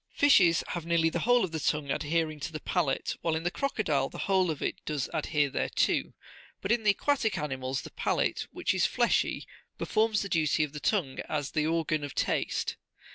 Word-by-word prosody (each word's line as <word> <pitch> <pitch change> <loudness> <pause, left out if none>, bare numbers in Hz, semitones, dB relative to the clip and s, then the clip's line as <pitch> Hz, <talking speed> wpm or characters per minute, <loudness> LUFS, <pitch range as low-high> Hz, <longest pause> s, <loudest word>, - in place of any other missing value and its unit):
Fishes 185 - +5
have 175 - -3
nearly 165 -1 +2
the 170 - -1
whole 245 -1 +5
of 185 - -2
the 160 - -3
tongue 150 -1 0
adhering 155 +1 -1
to 145 - -5
the 155 - -5
palate, 160 -6 -1
while 165 -1 0
in 160 - -3
the 175 - 0
crocodile 160 - 0
the - - -10
whole 190 -2 +2
of 155 - -2
it - - -3
does 150 -4 -2
adhere 150 -2 +1
thereto: - - 0 0.5
but 195 - -2
in 235 -1 +3
the 215 - +2
aquatic 225 +1 +1
animals 130 -3 -3
the - - -9
palate, - - -1
which - - -1
is - - +2
fleshy, - - +1 0.3
performs 215 -1 +1
the 200 - -5
duty 155 -2 +2
of 150 -1 -4
the 150 - -5
tongue 155 -8 0
as 145 -3 -2
the 155 -1 0
organ 160 -2 0
of 145 - -6
taste. - - -1
160 Hz, 200 wpm, -29 LUFS, 150-190 Hz, 0.5 s, Fishes